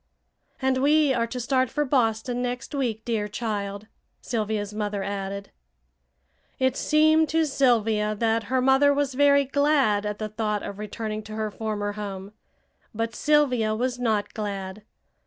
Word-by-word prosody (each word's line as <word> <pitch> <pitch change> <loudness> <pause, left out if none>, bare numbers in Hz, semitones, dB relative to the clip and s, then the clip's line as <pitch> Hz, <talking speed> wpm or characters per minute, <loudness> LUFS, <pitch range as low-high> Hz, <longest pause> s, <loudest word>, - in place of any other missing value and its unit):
"And 265 -1 +1
we 295 0 +4
are 230 -2 0
to 250 +2 -5
start 255 +1 +1
for 295 - -1
Boston 245 -2 0
next 245 +2 -4
week, 235 -6 -2
dear 220 -3 -1
child," 205 -2 -4 0.3
Sylvia's 215 -3 -2
mother 205 -2 -2
added. 200 0 -5 1.1
It 260 0 +1
seemed 315 +1 +3
to 320 0 +2
Sylvia 225 -6 +2
that 225 +1 0
her 255 +3 0
mother 270 +2 +4
was 285 -2 0
very 280 +1 +4
glad 275 -7 +2
at 210 0 -3
the 215 0 -4
thought 210 -1 -2
of 200 - -7
returning 215 0 -4
to 215 - -8
her 215 -1 -2
former 210 -1 -3
home. 200 -1 -6 0.6
But 230 +1 -2
Sylvia 255 -8 +2
was 245 +2 -2
not 220 -4 0
glad. 200 -1 -5
225 Hz, 150 wpm, -25 LUFS, 210-265 Hz, 1.1 s, we